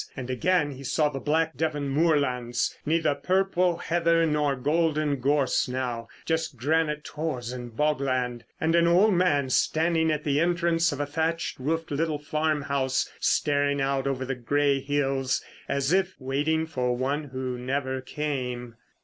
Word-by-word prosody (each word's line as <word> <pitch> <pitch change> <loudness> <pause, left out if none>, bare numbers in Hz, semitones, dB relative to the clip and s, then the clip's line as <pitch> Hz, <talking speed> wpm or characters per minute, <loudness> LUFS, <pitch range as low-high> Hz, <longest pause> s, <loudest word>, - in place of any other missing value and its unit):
And 130 -1 -4
again 150 +3 +1
he 135 0 -9
saw 150 +3 +1
the 135 -2 -5
black 160 +3 0
Devon 150 -3 -1
moorlands, 135 -5 +1
neither 160 -1 +2
purple 180 +3 +1
heather 170 0 +2
nor 150 -3 +1
golden 150 +1 +1
gorse 140 0 +2
now, 125 -2 -3 0.2
just 160 -4 -1
granite 150 +3 0
tors 140 -8 -4
and 120 -2 -8
bogland; 130 -5 0 0.2
and 160 +1 +1
an 170 0 +4
old 190 +5 +5
man 145 -7 +2
standing 160 +3 +2
at 150 -1 -2
the 145 -2 +1
entrance 170 0 +2
of 145 - -5
a 145 - 0
thatched 160 +2 -2
roofed 160 +5 -2
little 155 +1 0
farmhouse 145 -3 -1
staring 145 -1 +1
out 135 0 0
over 130 -1 -1
the 135 - -2
grey 140 +3 +1
hills—as 135 +1 -1
if 190 -1 +1
waiting 145 +4 0
for 125 -6 -1
one 140 +4 -1
who 130 -2 -4
never 130 +1 -2
came. 125 -4 -4
145 Hz, 150 wpm, -26 LUFS, 130-160 Hz, 0.2 s, old